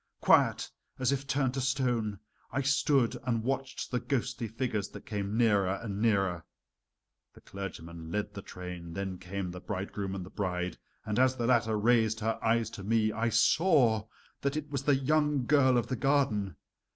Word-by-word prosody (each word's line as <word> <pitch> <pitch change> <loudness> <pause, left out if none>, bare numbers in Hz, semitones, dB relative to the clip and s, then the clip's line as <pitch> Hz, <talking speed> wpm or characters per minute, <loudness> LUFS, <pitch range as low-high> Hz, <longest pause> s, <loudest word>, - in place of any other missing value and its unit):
Quiet, - - +3 0.3
as 130 0 +1
if 140 0 -2
turned 135 -1 +1
to 135 - -2
stone, 125 -6 0 0.3
I 135 +3 -1
stood 140 -2 +2
and 115 -3 0
watched 135 +1 -3
the 125 - +1
ghostly 125 -1 -2
figures 110 -2 -2
that - - -11
came 105 0 -3
nearer 100 -5 +3
and 105 -3 -4
nearer. 95 -6 +1 0.9
The - - -16
clergyman 85 -4 -8
led 105 +3 -2
the 100 - -6
train, 90 -2 -8
then 95 -1 -4
came 95 0 -4
the 90 0 -8
bridegroom 100 0 -4
and 95 -2 -5
the 95 - -12
bride, 90 -2 -3 0.3
and 110 +1 -1
as 130 0 +4
the 120 -2 -2
latter 115 -3 +2
raised 110 0 +3
her 110 +1 -1
eyes 115 -1 +2
to 100 - -8
me 110 +1 +2
I 115 +2 0
saw 120 - +3 0.3
that 140 +2 0
it 150 -1 -5
was 140 -2 -1
the 145 - +5
young 150 0 +1
girl 130 -2 +4
of 120 - +1
the 130 - -2
garden. 125 - +1
115 Hz, 175 wpm, -30 LUFS, 100-130 Hz, 0.9 s, the